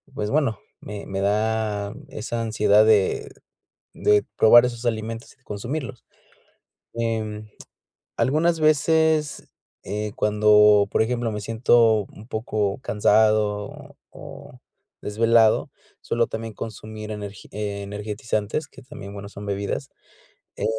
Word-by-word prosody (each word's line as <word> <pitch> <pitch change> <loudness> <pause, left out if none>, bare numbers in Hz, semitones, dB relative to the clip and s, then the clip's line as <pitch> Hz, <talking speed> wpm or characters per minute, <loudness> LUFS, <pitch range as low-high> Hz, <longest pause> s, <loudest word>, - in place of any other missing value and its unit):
pues 105 0 -3
bueno, 140 -8 +1 0.2
me 105 -1 -8
me 95 0 -4
da 105 0 0 0.2
esa 115 +2 -4
ansiedad 105 -2 +3
de 105 -3 +2 0.7
de 105 -1 +3
probar 120 +2 +7
esos 120 -1 -5
alimentos 115 +1 -3
y 135 - -40
consumirlos, 125 +5 -6 0.9
em, 110 -2 -3 0.7
algunas 160 +4 +2
veces, 155 0 +2 0.4
eh, 105 +1 -3
cuando, 105 -1 +5
por - - +2
ejemplo, 120 0 -1
me 105 - -4
siento 115 -1 +3
un 105 - -13
poco 110 -4 -2
cansado 110 -1 +3 0.2
o - - -13 0.2
o - - -12 0.4
desvelado, 115 +1 +3 0.3
suelo 115 0 0
también 110 0 -6
consumir 110 0 -8
energi 105 -2 -8
energetizantes, 105 +4 -3
que 135 - -15
también, 125 -7 -10
bueno, 100 0 -8
son 100 0 -9
bebidas, 100 0 -3 0.7
eh, - - -4
110 Hz, 115 wpm, -23 LUFS, 105-115 Hz, 0.9 s, probar